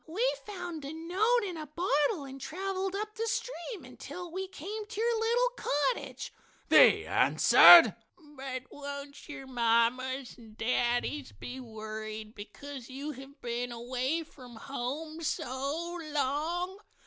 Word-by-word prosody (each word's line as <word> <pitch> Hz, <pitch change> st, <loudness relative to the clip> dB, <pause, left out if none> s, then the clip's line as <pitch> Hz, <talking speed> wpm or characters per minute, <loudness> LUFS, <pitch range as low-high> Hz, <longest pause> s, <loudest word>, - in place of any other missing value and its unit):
"We 415 Hz, +10 st, 0 dB, 0.2 s
found 350 Hz, -6 st, -6 dB
a 280 Hz, -, -5 dB
note 390 Hz, +9 st, +1 dB
in 365 Hz, -4 st, -4 dB
a 310 Hz, -1 st, -6 dB
bottle 300 Hz, 0 st, +1 dB
and 270 Hz, 0 st, -9 dB
traveled 380 Hz, +5 st, -3 dB
up 425 Hz, +1 st, -3 dB
the 455 Hz, 0 st, -3 dB
stream 450 Hz, -2 st, -4 dB
until 355 Hz, -2 st, -8 dB
we 380 Hz, +2 st, -4 dB
came 410 Hz, +5 st, -6 dB
to 435 Hz, -1 st, -7 dB
your 460 Hz, 0 st, +2 dB
little 475 Hz, +2 st, +2 dB
cottage," 295 Hz, -, -1 dB, 0.4 s
they -, -, +7 dB
answered. 345 Hz, -1 st, +8 dB, 0.4 s
"But 265 Hz, -1 st, -5 dB
won't 280 Hz, 0 st, -8 dB
your 280 Hz, -2 st, -7 dB
mamas 250 Hz, +2 st, +1 dB
and 220 Hz, -2 st, -15 dB
daddies 245 Hz, +4 st, 0 dB
be 255 Hz, +1 st, -8 dB
worried 215 Hz, -2 st, -7 dB
because 250 Hz, +5 st, -9 dB
you 280 Hz, +3 st, -5 dB
have 270 Hz, +1 st, -12 dB
been 240 Hz, +1 st, -3 dB
away 255 Hz, +7 st, -2 dB
from 250 Hz, -6 st, -14 dB
home 280 Hz, +7 st, -5 dB
so 315 Hz, +3 st, -3 dB
long?" 320 Hz, +7 st, -1 dB
290 Hz, 135 wpm, -30 LUFS, 255-360 Hz, 0.4 s, answered